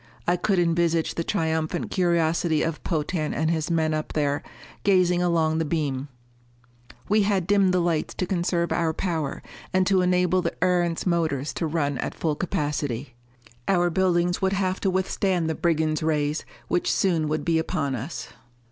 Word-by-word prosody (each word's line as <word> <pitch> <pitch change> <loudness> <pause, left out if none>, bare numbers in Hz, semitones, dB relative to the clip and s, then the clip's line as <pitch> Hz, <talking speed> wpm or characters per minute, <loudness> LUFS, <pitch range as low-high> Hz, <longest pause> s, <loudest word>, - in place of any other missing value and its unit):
I 175 - +4
could 190 +2 0
envisage 170 -1 +2
the 165 - -2
triumphant 160 -4 -1
curiosity 170 -3 +2
of 165 -1 -3
Potan 155 -1 -1
and 160 +2 +1
his 160 -1 -1
men 160 -2 +1
up 155 0 -3
there, 145 -2 0 0.4
gazing 180 -3 +3
along 165 -2 +2
the - - +1
beam. 145 -4 -2 1.0
We 210 +1 +3
had 195 -3 +1
dimmed 200 -1 +3
the 180 - +2
lights 170 -3 0
to 185 - -1
conserve 175 -1 0
our 165 -2 +1
power, 160 -5 -3 0.3
and 185 0 +2
to 190 -1 +3
enable 180 0 +2
the - - -2
Erentz 175 -2 +1
motors 160 -6 0
to 165 - -2
run 145 -4 -1
at - - -3
full 160 -2 0
capacity. 145 -6 -2 0.5
Our 175 -2 +2
buildings 175 0 +1
would 190 0 +1
have 190 -1 0
to 195 - +1
withstand 185 -2 0
the 160 - 0
brigands' 160 -2 0
rays 150 -1 0 0.2
which 175 - +1
soon 170 -5 +1
would 155 0 -2
be 165 -1 +2
upon 140 -3 -1
us. 130 +1 -5
170 Hz, 165 wpm, -25 LUFS, 155-180 Hz, 1.0 s, I